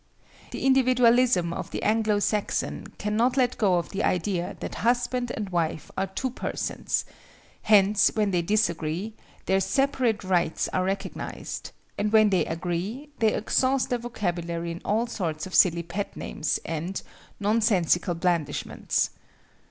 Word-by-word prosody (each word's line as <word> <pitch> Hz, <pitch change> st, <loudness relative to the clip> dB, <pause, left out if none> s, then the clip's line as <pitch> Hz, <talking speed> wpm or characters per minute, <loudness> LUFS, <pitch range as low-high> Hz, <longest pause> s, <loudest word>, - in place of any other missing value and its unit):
The -, -, -5 dB
individualism 250 Hz, -8 st, +4 dB
of -, -, -5 dB
the -, -, -4 dB
Anglo 215 Hz, -1 st, +2 dB
Saxon 205 Hz, 0 st, -1 dB
cannot 230 Hz, +5 st, +1 dB
let 250 Hz, -2 st, +2 dB
go 195 Hz, -4 st, +3 dB
of 175 Hz, -, -1 dB
the 195 Hz, -, -3 dB
idea 180 Hz, 0 st, -1 dB
that -, -, -6 dB
husband 245 Hz, +1 st, +1 dB
and 205 Hz, -3 st, -4 dB
wife 165 Hz, -3 st, -2 dB
are 195 Hz, 0 st, -1 dB
two 255 Hz, +7 st, -3 dB
persons;—hence 210 Hz, -4 st, 0 dB
when 210 Hz, -2 st, +1 dB
they 175 Hz, -2 st, +2 dB
disagree, 180 Hz, 0 st, 0 dB, 0.3 s
their 190 Hz, 0 st, +2 dB
separate 255 Hz, 0 st, +1 dB
rights 175 Hz, -4 st, +1 dB
are 185 Hz, 0 st, 0 dB
recognized, 195 Hz, 0 st, -4 dB, 0.3 s
and 210 Hz, 0 st, 0 dB
when 215 Hz, -1 st, +5 dB
they 185 Hz, -, +2 dB
agree, 180 Hz, -, -3 dB
they 220 Hz, -2 st, +4 dB
exhaust 260 Hz, +4 st, +1 dB
their 245 Hz, -, +1 dB
vocabulary 175 Hz, -7 st, -3 dB
in 170 Hz, -, -7 dB
all 220 Hz, +3 st, +1 dB
sorts 165 Hz, -10 st, -3 dB
of 185 Hz, -, -9 dB
silly 170 Hz, -2 st, +5 dB
pet 190 Hz, +4 st, -5 dB
names 155 Hz, -, -2 dB
and—nonsensical 185 Hz, +2 st, 0 dB
blandishments. 170 Hz, -3 st, -1 dB
200 Hz, 135 wpm, -26 LUFS, 175-230 Hz, 0.3 s, when